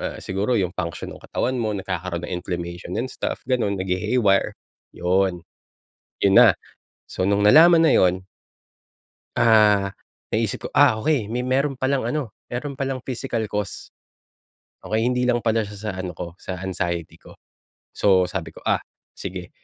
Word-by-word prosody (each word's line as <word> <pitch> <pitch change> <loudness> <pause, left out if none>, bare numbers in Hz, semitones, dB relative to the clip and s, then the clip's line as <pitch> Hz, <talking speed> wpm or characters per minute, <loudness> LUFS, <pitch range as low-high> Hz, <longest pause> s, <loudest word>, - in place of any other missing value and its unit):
ah, - - -4
siguro 100 +6 -1
yung 90 -2 0
function 85 -2 -4
ng - - -16
katawan 125 -1 -1
mo 105 -2 -1
nagkakaroon 90 -2 -4
ng - - -6
inflammation 85 0 -5
and 130 - -3
stuff - - -4
gano'n 110 -6 +1
naghi-haywire, 95 +3 +1 0.4
'yon. 90 -1 +1 0.8
'Yon 100 - +5
na, - - +8 0.5
so 95 - -2
nung 100 +1 +2
nalaman 165 +8 +7
na - - +4
'yon 95 0 +2 1.1
Ah, 105 -3 +4 0.4
naisip - - -1
ko - - -3
ah, 110 - +5
okey. 115 -3 0
May 125 +2 -2
meron 135 +2 0
palang 130 -2 0
ano, 130 -6 -3 0.2
meron 140 +4 -4
palang 135 -2 -4
physical 125 -3 -3
cause, 105 -1 -4 0.9
okey, 110 +1 -1
hindi 125 +2 +1
lang 120 -1 +2
pala 115 -1 +1
siya 105 -1 -9
sa 105 0 -4
ano 95 -1 -4
ko, 85 +1 -6
sa 90 -1 -7
anxiety 85 -3 -3
ko. - - -17 0.5
So 95 -2 +3
sabi 80 -5 -5
ko, - - -13
"Ah, - - +2 0.4
sige." 90 -1 -6
105 Hz, 155 wpm, -23 LUFS, 95-125 Hz, 1.1 s, na